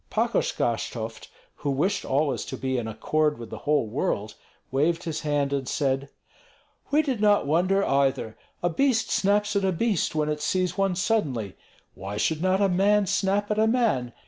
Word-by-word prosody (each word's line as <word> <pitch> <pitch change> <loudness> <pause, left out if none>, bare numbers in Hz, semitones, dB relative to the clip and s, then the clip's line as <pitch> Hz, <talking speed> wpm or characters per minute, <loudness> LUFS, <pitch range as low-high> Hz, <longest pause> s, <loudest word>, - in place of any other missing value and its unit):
Pakosh - - 0
Gashtovt, 115 -1 -3 0.3
who 145 - -3
wished 175 +9 0
always 135 -4 0
to - - -6
be 130 -1 -1
in 115 - -4
accord 150 +7 0
with 115 -2 -9
the - - -6
whole 150 -5 +3
world, 110 - -2 0.4
waved 155 +6 +1
his 165 -3 -3
hand 145 -2 0
and 135 -2 -2
said: 140 -1 -1 0.8
"We 300 +2 +3
did 260 -8 -2
not 205 -4 +4
wonder, 185 +6 +2
either. 135 -5 +1 0.3
A 175 - +3
beast 235 0 +1
snaps 205 +1 +1
at 200 - +1
a 190 - +2
beast 195 -2 0
when 150 -1 +1
it 150 0 -2
sees 180 +2 0
one 195 -1 +1
suddenly; 145 - -1 0.4
why 100 +2 -6
should 155 +7 0
not 185 +2 +2
a 200 - +4
man 200 +3 +3
snap 200 +3 0
at 210 - +1
a 220 - +4
man? 220 - +1
160 Hz, 180 wpm, -26 LUFS, 135-200 Hz, 0.8 s, not